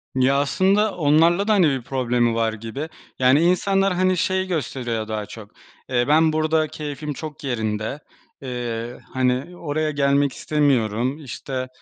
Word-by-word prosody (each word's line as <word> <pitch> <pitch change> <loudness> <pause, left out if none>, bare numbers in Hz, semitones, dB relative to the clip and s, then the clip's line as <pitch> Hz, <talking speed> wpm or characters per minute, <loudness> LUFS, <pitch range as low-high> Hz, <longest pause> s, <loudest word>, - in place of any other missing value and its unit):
Ya, 130 +2 +3
aslında 195 +8 +2
onlarla 165 +5 +3
da, 215 - +4
hani, 180 -7 +4
bir 135 -2 -1
problemi 120 -2 0
var 115 -1 +1
gibi. 115 +9 -6 0.3
Yani, 130 +3 +5
insanlar, 195 +2 +2
hani, 185 0 +2
şeyi 190 +2 0
gösteriyor 120 -9 -3
daha 110 -1 -3
çok: 105 0 -11 0.4
"Eee, 120 -1 +1
ben 155 +1 +4
burada 155 0 +1
keyfim 150 -1 -5
çok 150 0 -8
yerinde. 110 0 -2 0.4
Eee, 120 -2 -4
hani, 130 +6 0
oraya 155 -1 -1
gelmek 140 -1 +2
istemiyorum. 130 -2 0
İşte, 130 0 -5
140 Hz, 140 wpm, -22 LUFS, 120-160 Hz, 0.4 s, Yani